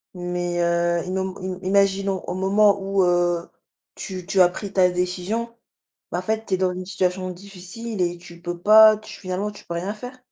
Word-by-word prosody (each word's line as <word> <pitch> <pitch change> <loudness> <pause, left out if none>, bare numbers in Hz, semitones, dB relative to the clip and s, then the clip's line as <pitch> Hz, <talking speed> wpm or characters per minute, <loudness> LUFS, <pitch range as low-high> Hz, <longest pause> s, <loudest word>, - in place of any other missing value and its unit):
Mais 175 -1 -3
heu, 170 0 +1
imo 190 0 -3
m 185 -1 -5
im 185 - -5
imaginons 195 -1 +2
au - - -2
moment 200 +2 +3
où 195 0 +1
heu, 175 -1 +1 0.5
tu 185 -3 -6
tu 195 0 +2
as 180 - +7
pris 200 +2 -7
ta 185 -2 +4
décision, 180 +6 -2 0.6
bah, 175 - -1
en - - -4
fait, 220 +2 -2
tu 190 - +1
es - - -3
dans 185 -1 +1
une 185 0 -6
situation 185 0 -1
difficile 195 +3 -7
et 175 0 0
tu 170 -1 -14
peux 175 0 -5
pas 215 +2 +8
tu 215 - -12
finalement 190 +2 -3
tu 205 - -14
peux 170 - -5
rien 185 +5 -3
faire. 245 +4 -9
185 Hz, 205 wpm, -23 LUFS, 180-200 Hz, 0.6 s, pas